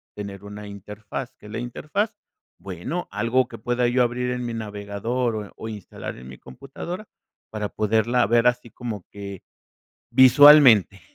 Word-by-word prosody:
tener 100 -1 -7
una 105 0 -9
interfaz, 105 +5 -7
¿qué 105 - -13
es - - -11
la 110 - -4
interfaz? 155 - -3 0.5
Bueno, 100 - -5
algo 115 +4 +1
que 115 - -10
pueda 120 +2 0
yo 125 +1 +3
abrir 125 +1 -1
en 125 0 -3
mi 120 - -4
navegador, 110 +3 -3
o 105 -2 -6
o 110 - -7
instalar 105 -4 -8
en 65 - -12
mi 65 - -10
computadora 170 - -8 0.4
para 105 -1 -3
poderla 110 +4 +1
ver 115 +1 +3
así 125 -1 0
como 115 -6 -6
que 100 -2 -8 0.7
visualmente, 130 - +7
115 Hz, 155 wpm, -23 LUFS, 105-125 Hz, 0.7 s, visualmente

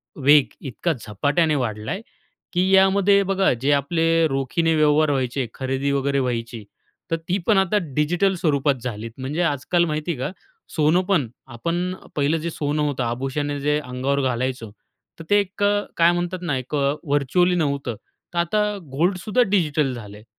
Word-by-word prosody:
वेग 145 0 +5 0.2
इतका 140 +6 -2
झपाट्याने 145 - 0
वाढला 110 -5 -3
आहे 190 +4 -3 0.5
की 180 +2 +2
यामध्ये 195 +1 +5
बघा, 195 0 +2
जे 130 +4 0
आपले 165 +3 +2
रोखीने 150 +4 0
व्यवहार 150 0 +3
व्हायचे, 130 -1 -1
खरेदी 135 +1 -2
वगैरे 140 0 +1
व्हायची, 115 -3 -3 0.5
तर - - +3
ती 185 - +2
पण 215 - +4
आता 195 +2 +2 0.2
डिजिटल 175 +6 +2
स्वरूपात 145 -5 +1
झालीत, 115 -2 -5
म्हणजे 135 +6 -3
आजकाल 170 +3 +1
माहिती 155 +1 -2
आहे 135 - -5
का? 130 - -2 0.4
सोनं 155 +4 +3
पण 180 -10 +1 0.2
आपण 170 +9 -2 0.2
पहिलं 150 +2 +1
जे 165 +1 -3
सोनं 150 -1 -2
होतं, 140 -3 -1
आभूषणे 135 +4 -2
जे 150 +1 +1
अंगावर 135 +1 -2
घालायचो, 125 -3 -2 0.5
तर - - -7
ते 205 - +5
एक 200 0 -3
अ, 205 0 +3 0.2
काय 170 +1 +5
म्हणतात 175 +1 -2
ना, 155 -6 -1
एक 130 +3 -5
अ, 140 0 +1
व्हर्चुअली 155 +5 +2
नव्हतं, 140 -7 -1 0.4
तर - - -5
आता 210 +4 0
गोल्डसुद्धा 180 - +1
डिजिटल 155 - +1
झाल 105 -4 -9
आहे. 105 - -14
150 Hz, 165 wpm, -22 LUFS, 135-175 Hz, 0.5 s, वेग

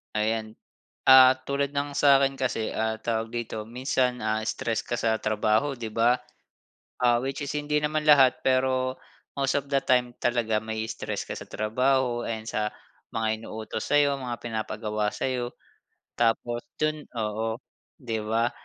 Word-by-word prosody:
Ayan. 110 0 -1 0.5
Ah, 130 0 +9
tulad 140 0 0
ng 145 0 -2
sa'kin 135 -1 +5
kasi 125 -4 -1
ah 110 0 -1
tawag 115 0 -2
dito, 115 -2 -4
minsan, 125 +1 0
ah, 110 0 0
stress 115 0 -2
ka 120 - -3
sa 110 -1 +1
trabaho 110 +6 +1
'di 115 - -4
ba? 120 +2 +3 0.8
Ah, 120 -1 +4
which 135 +3 -4
is 140 - -3
hindi 150 0 0
naman 150 0 -1
lahat 135 -4 +6
pero, 130 0 +1 0.4
most 135 -1 0
of 140 - -12
the 140 - +4
time 125 -2 +2
talaga 115 -3 +1
ma-i-stress 110 0 -4
ka - - -4
sa - - -9
trabaho 120 +2 +1
and 110 -1 -3
sa 105 0 -1 0.4
mga 110 -1 0
inuutos 110 0 -5
sa'yo, 145 -1 +3
mga 120 -2 -4
pinapagawa 110 -2 -2
sa'yo 125 -2 -2 0.7
tapos 120 +1 +1 0.2
dun 155 -1 0
oo 110 0 -2 0.4
'di 115 -4 -3
ba? 115 +2 +1
120 Hz, 150 wpm, -26 LUFS, 110-135 Hz, 0.8 s, Ah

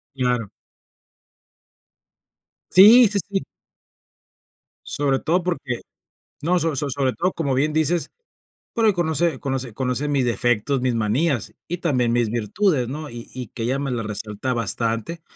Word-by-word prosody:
Claro. 125 -5 0 2.2
Sí, 220 +5 +8
sí, 205 0 -1
sí. 195 -1 -1 1.5
Sobre 140 -2 0
todo 175 +4 +1
porque 145 -9 -3 0.6
no, 175 +3 +2
so 165 -2 0
so 140 +1 -1
sobre 135 -1 0
todo, 180 +1 0
como 140 -5 -1
bien 150 +4 +1
dices, 160 +2 +1 0.6
porque 220 -3 +3
conoce 170 -1 0
conoce 130 -4 -3
conoce 130 +3 -1
mis 140 -3 +1
defectos, 120 +3 +1
mis 125 -2 0
manías 120 - 0
y 175 - -3
también 125 -9 +1
mis 120 -2 +1
virtudes, 125 - 0
¿no? 150 +3 -6
Y 120 0 -9
y 125 -3 -6
que 115 - -6
ella 130 +4 0
me 140 -2 -2
las 115 -3 -2
resalta 105 +4 -3
bastante, 115 - -2
135 Hz, 140 wpm, -22 LUFS, 120-165 Hz, 2.2 s, Sí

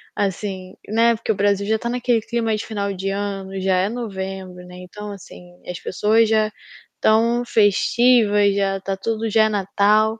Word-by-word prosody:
Assim, 190 -1 -3
né, 230 +2 +3
porque 220 - -2
o - - -1
Brasil 200 0 +1
já 220 +1 +2
está 235 - -5
naquele 245 -1 +1
clima 225 0 -1
de 215 - -5
final 200 -2 -3
de 195 +1 -4
ano, 195 -1 -4
já 190 -1 +2
é 185 +2 +1
novembro, 190 -5 -6
né, 180 0 -12
então, 210 +3 -9
assim, 195 - -12 0.3
as 180 -1 -5
pessoas 220 +4 +2
já 215 -1 +2 0.4
estão 230 +2 +2
festivas, 210 -1 +3
já 195 -1 0
está 195 0 -4
tudo 225 +2 -2
já 220 +1 +4
é - - +1
Natal. 210 +2 +2
205 Hz, 175 wpm, -21 LUFS, 195-225 Hz, 0.4 s, já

